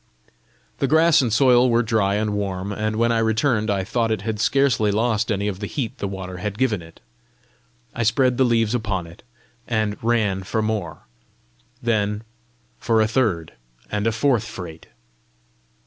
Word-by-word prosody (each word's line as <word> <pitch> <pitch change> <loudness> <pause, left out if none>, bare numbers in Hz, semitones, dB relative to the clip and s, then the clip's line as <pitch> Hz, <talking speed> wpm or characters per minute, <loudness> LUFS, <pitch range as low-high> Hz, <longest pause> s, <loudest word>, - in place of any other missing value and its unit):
The 135 - +1
grass 160 +2 +5
and 120 -4 -1
soil 125 +1 +5
were 120 0 +3
dry 110 -3 +1
and 105 0 -1
warm; 100 -1 -3
and 110 +1 -2
when 115 +1 +2
I 115 - +2
returned 110 0 +1
I 100 -2 0
thought 115 +3 -1
it 110 -3 -2
had 110 -1 -3
scarcely 130 -4 +2
lost 110 +1 0
any 100 0 -1
of 95 -2 -3
the 105 - -4
heat 120 -3 -4
the 100 - -2
water 95 -1 -6
had 105 +2 -4
given 115 -7 +1
it. 80 0 -15 0.9
I - - -3
spread 125 +3 +2
the - - +6
leaves 115 -2 +2
upon 105 -7 -2
it, 85 +1 -14 0.5
and 110 -3 -1
ran 110 -5 +1
for 110 +4 -2
more 100 -7 -3 0.8
then 105 -2 0 0.6
for 115 -2 +1
a 110 - +3
third 110 -10 0 0.4
and 105 +1 0
a - - +3
fourth 115 0 +1
freight. 85 -7 -9
110 Hz, 170 wpm, -22 LUFS, 100-115 Hz, 0.9 s, the